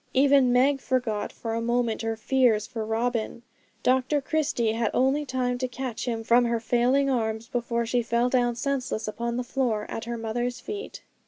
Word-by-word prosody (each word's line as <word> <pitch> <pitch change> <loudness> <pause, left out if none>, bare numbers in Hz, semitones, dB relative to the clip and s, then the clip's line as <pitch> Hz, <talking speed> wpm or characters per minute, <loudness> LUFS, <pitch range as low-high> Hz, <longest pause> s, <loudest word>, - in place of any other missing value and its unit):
Even 270 -1 +5
Meg 270 +3 +3
forgot 245 -6 -1
for 225 -1 -5
a 230 - -1
moment 235 -1 0
her 225 0 -2
fears 230 -3 +2
for 230 -2 -5
Robin. 230 +1 -2 0.4
Dr 260 +3 +2
Christie 275 -6 0
had 225 -1 0
only 275 +3 +2
time 250 -1 -1
to 255 - -1
catch 250 -2 -5
him 225 -2 -2
from 240 +2 +4
her 235 -1 0
failing 250 +4 +2
arms, 225 -3 -1
before 235 -1 -1
she 240 +2 +1
fell 235 +1 +1
down 245 -2 +1
senseless 255 -3 -2
upon 235 +2 -3
the 250 - -1
floor 245 -4 -1
at 225 - -4
her 235 0 -4
mother's 240 +2 -2
feet. 415 - -7
240 Hz, 180 wpm, -26 LUFS, 230-255 Hz, 0.4 s, Even